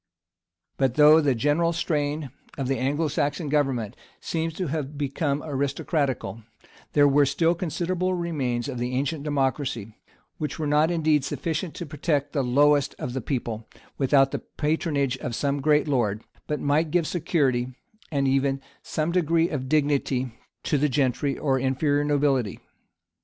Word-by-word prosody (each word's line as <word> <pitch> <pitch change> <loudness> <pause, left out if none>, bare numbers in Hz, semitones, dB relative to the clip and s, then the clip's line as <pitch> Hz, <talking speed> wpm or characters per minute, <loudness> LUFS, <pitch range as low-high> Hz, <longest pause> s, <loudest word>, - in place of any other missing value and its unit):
But 130 -2 +1
though 150 +1 +7
the 140 -4 +2
general 150 +8 +2
strain 150 -4 -1 0.3
of 135 -2 -2
the 135 0 0
Anglo 145 +5 0
Saxon 145 +2 -1
government 130 -7 0 0.2
seems 165 0 -2
to 185 - -2
have 150 -2 -3
become 140 +1 -1
aristocratical, 140 -3 -1 0.5
there 145 -1 +6
were 145 +1 +5
still 165 +5 +2
considerable 180 +2 -1
remains 140 -8 -2
of 130 -4 -4
the 125 +1 -2
ancient 140 +3 -1
democracy, 135 -6 -1 0.4
which 150 - -3
were 160 - -2
not 150 +2 +3
indeed 155 -4 +2
sufficient 160 +4 -3
to 175 - -5
protect 145 -1 -1
the 145 - +1
lowest 145 +3 +3
of 125 - -4
the 130 - -2
people, 115 -3 -4 0.3
without 135 0 +4
the - - -2
patronage 150 -4 -1
of 120 -1 -4
some 140 +1 -1
great 150 +1 +3
lord, 115 -6 0 0.2
but 150 - -1
might 150 +3 +1
give 170 +1 +1
security, 135 -8 0 0.4
and 140 -2 +1
even 135 0 +1 0.2
some 155 +2 -2
degree 170 -1 +2
of 130 -4 -4
dignity, 140 -4 +1 0.3
to 150 - +1
the 150 +1 +2
gentry 135 +1 0
or 135 -3 +1
inferior 145 +3 +1
nobility. 140 -7 +1
145 Hz, 150 wpm, -25 LUFS, 135-155 Hz, 0.5 s, though